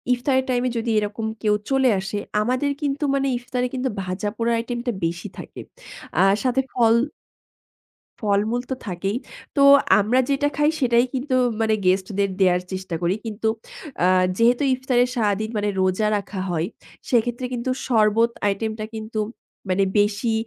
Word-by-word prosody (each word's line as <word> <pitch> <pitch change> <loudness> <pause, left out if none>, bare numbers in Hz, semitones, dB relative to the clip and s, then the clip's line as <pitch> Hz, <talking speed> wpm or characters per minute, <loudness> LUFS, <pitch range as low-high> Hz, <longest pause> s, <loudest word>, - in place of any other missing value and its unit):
ইফতারের 260 +1 0
টাইমে 250 0 +1
যদি 230 +1 -2
এরকম 210 +2 -3 0.2
কেউ 210 -1 +3
চলে 265 -1 +3
আসে, 195 +2 -4 0.2
আমাদের 255 +5 0
কিন্তু 285 +1 -1
মানে 275 0 +1
ইফতারে 250 +1 -2
কিন্তু 260 0 -1
ভাজাপোড়ার 205 +5 -2
আইটেমটা 240 +1 -3
বেশি 170 +1 -3
থাকে। - - -9 0.6
আ - - +6 0.2
সাথে 260 +1 +2
ফল 230 -2 +4 1.3
ফলমূল 215 +3 +1
তো - - +1
থাকেই। 195 +4 -2 0.4
তো - - +3 0.4
আমরা 240 +6 +2
যেটা 290 +1 +2
খাই, 295 +1 +3
সেটাই 240 -1 +4
কিন্তু 260 0 -1 0.3
মানে 220 -1 +2
গেস্টদের 195 +1 +1
দেয়ার 180 -1 +4
চেষ্টা 185 -2 -4
করি। 175 +2 +2
কিন্তু 220 0 -2 0.6
আ - - +5 0.3
যেহেতু 240 +4 +4
ইফতারে 255 -1 +2
সারাদিন 215 0 0
মানে 205 0 0
রোজা 185 +3 +1
রাখা 200 -1 -5
হয়, 165 0 0 0.4
সেক্ষেত্রে 240 +1 +1
কিন্তু 245 +2 -2 0.2
শরবত 225 0 +3 0.2
আইটেমটা 215 +2 -2
কিন্তু 220 0 -4 0.5
মানে 195 +1 +3
বেশি 210 +3 +1
225 Hz, 145 wpm, -23 LUFS, 205-250 Hz, 1.3 s, আ